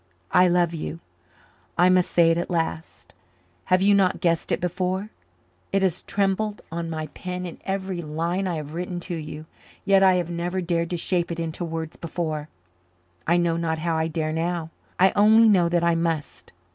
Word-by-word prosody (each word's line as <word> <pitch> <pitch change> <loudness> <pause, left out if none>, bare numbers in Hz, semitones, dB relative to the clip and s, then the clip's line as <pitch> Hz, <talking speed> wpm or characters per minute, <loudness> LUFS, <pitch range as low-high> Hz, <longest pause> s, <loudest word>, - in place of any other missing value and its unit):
I 180 - +6
love 175 -1 +2
you. 165 0 -5 0.8
I 180 - +5
must 185 -1 +3
say 170 -1 +4
it 165 - +1
at 175 - -3
last. 165 -2 -3 0.5
Have 185 +1 +3
you 205 +1 +5
not 195 -2 +3
guessed 170 -2 0
it - - +1
before? 185 +3 -2 0.6
It 195 0 +2
has 185 -2 +1
trembled 205 +1 -1
on 165 0 -3
my 155 -1 -3
pen 180 0 -5
in 170 - -8
every 190 -2 -2
line 170 +5 -2
I 175 - -1
have 150 -1 -6
written 175 +1 -4
to 175 0 -5
you 155 -1 -7 0.4
yet 195 -1 +5
I 190 -1 +6
have 175 -1 -1
never 175 +2 -2
dared 170 -2 -1
to 175 - -2
shape 175 0 0
it 170 - -4
into 165 +1 -4
words 160 -1 -5
before. 155 -2 -4 0.8
I 170 +2 +4
know 170 -1 +1
not 165 -1 -1
how 165 +1 -1
I 160 0 +1
dare 155 -1 -2
now. 165 0 -2 0.3
I 190 +1 +6
only 220 +2 +6
know 180 -5 +4
that 170 0 +1
I 170 0 +3
must. 165 -2 -3
175 Hz, 190 wpm, -24 LUFS, 165-185 Hz, 0.8 s, I